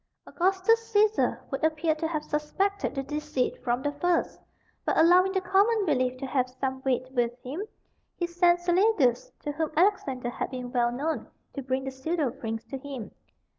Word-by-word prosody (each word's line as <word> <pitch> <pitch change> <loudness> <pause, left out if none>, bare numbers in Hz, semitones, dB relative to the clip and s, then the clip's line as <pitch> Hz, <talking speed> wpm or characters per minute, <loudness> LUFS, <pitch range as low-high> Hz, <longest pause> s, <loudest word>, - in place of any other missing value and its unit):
Augustus 390 +6 +1
Cæsar 425 0 +3
would 270 +1 -3
appear 315 0 +2
to 315 +1 -2
have 310 -2 -2
suspected 365 +5 -1
the 270 - -2
deceit 295 -3 -2
from 245 +1 0
the 290 - 0
first, 345 +4 0 0.4
but - - 0
allowing 360 +4 +6
the 380 -1 0
common 400 +4 +3
belief 255 -5 +1
to 270 - -5
have 255 -1 0
some 265 +1 -3
weight 255 -1 0
with 240 -2 +1
him, 280 +9 -4 0.5
he 350 - -1
sent 345 0 +3
Celadus, 350 - +2
to 295 - -2
whom 315 +1 -2
Alexander 275 -10 +1
had - - -3
been 250 -2 -6
well 240 -2 +2
known, 295 +6 -2 0.3
to 280 - -4
bring 260 0 -2
the 270 - -4
pseudo 280 +1 -1
prince 225 -3 -5
to 270 - -6
him. 265 -5 -7
295 Hz, 175 wpm, -27 LUFS, 260-355 Hz, 0.5 s, allowing